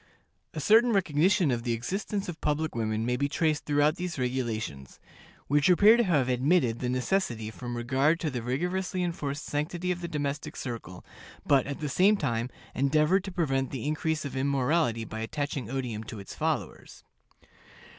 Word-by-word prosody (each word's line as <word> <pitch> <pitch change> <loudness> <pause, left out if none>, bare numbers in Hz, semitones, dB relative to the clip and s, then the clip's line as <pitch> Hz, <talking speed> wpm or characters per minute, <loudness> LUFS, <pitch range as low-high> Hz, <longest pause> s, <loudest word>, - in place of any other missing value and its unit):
A - - -2
certain 230 +2 +5
recognition 175 -2 +3
of 120 -1 -1
the 120 0 -1
existence 195 - -3
of 175 -3 -7
public 150 +1 0
women 110 -1 -1
may 125 +1 +1
be 140 +2 0
traced 155 0 0
throughout 150 +2 +2
these 180 -2 -4
regulations, 120 - -3 0.5
which 145 +4 +3
appear 205 +5 +7
to 240 - +3
have 150 - +2
admitted 125 -1 +2
the 125 - -2
necessity 125 - -1
from 120 +1 -6
regard 135 +7 +2
to 155 - -1
the 125 -2 -3
rigorously 180 - -1
enforced 150 -4 -3
sanctity 170 +5 -2
of 175 0 -3
the 170 - -3
domestic 150 -1 -3
circle, 115 -8 -7 0.4
but, 135 -3 +3
at 140 +1 -5
the 150 - -1
same 195 +9 +4
time, 120 -6 -1 0.2
endeavored 150 +7 +2
to 195 - -5
prevent 135 -7 0
the 130 -2 -5
increase 155 0 -1
of 140 - -5
immorality 135 -3 +1
by 110 +1 -6
attaching 135 0 -3
odium 125 -5 -3
to 110 0 -8
its 100 - -9
followers. - - -3
145 Hz, 170 wpm, -28 LUFS, 125-170 Hz, 0.5 s, appear